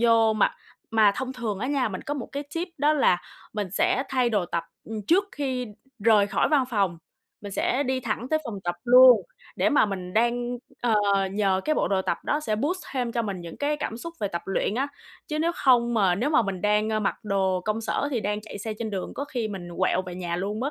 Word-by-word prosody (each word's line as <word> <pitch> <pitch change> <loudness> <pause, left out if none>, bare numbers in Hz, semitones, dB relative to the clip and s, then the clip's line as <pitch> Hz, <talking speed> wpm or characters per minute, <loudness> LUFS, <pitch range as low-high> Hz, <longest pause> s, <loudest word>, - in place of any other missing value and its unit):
vô 230 -1 +5
mà 215 - +2 0.4
mà 215 -3 +5
thông 260 0 -3
thường 230 -6 -3
á 235 - -2
nha, 275 -4 +1
mình 190 -3 -6
có 290 - -3
một 265 - -5
cái 285 +1 -3
tip 345 +3 -2
đó 295 +2 +4
là 225 -12 +3 0.3
mình 205 -4 -3
sẽ 250 +6 +2
thay 255 -3 +1
đồ 205 -5 +1
tập 170 -1 -2 0.4
trước 375 +4 +4
khi 260 -3 -2 0.4
rời 210 -3 +5
khỏi - - +1
văn 290 -4 +3
phòng, 195 -6 0 0.4
mình 205 -1 -8
sẽ 255 +7 +1
đi 260 -1 -1
thẳng 235 +1 -3
tới 310 - +3
phòng 225 -6 -5
tập 175 0 -1
luôn 250 -1 +8 0.3
để - - +3
mà 290 -7 +4
mình 185 -3 -5
đang, 240 +2 +1 0.3
ờ, 240 -2 +2 0.4
nhờ 195 -2 +1
cái 310 - +2
bộ - - +1
đồ 190 -1 +1
tập 170 - -1
đó 295 - 0
sẽ 215 -8 -1
boost 330 - -1
thêm 245 -3 -1
cho 235 - 0
mình 195 -5 -4
những 170 -1 -9
cái 295 +1 0
cảm 225 - -4
xúc 335 +8 -7
về 205 - 0
tập 170 -3 -4
luyện 195 +1 -1
á, 270 +4 0 0.4
chứ 305 - -2
nếu 335 +2 +1
không 240 -3 +3
mà 195 -5 +3
nếu 240 +11 0
mà 310 -5 +4
mình 195 -3 -3
đang 210 +1 +2
mặc 195 - +1
đồ 190 -3 +1
công 215 +1 -1
sở 280 +5 -1
thì 245 -5 0
đang 210 +1 -2
chạy 215 -1 -9
xe 220 +2 -4
trên 225 -2 -3
đường, 190 -2 -4
có 280 - -3
khi 245 -6 -3
mình 185 -4 -6
quẹo 185 0 +2
về 180 -1 -8
nhà 175 -1 -3
luôn 205 +4 -3
mất. 275 +3 -1
225 Hz, 240 wpm, -26 LUFS, 195-260 Hz, 0.4 s, luôn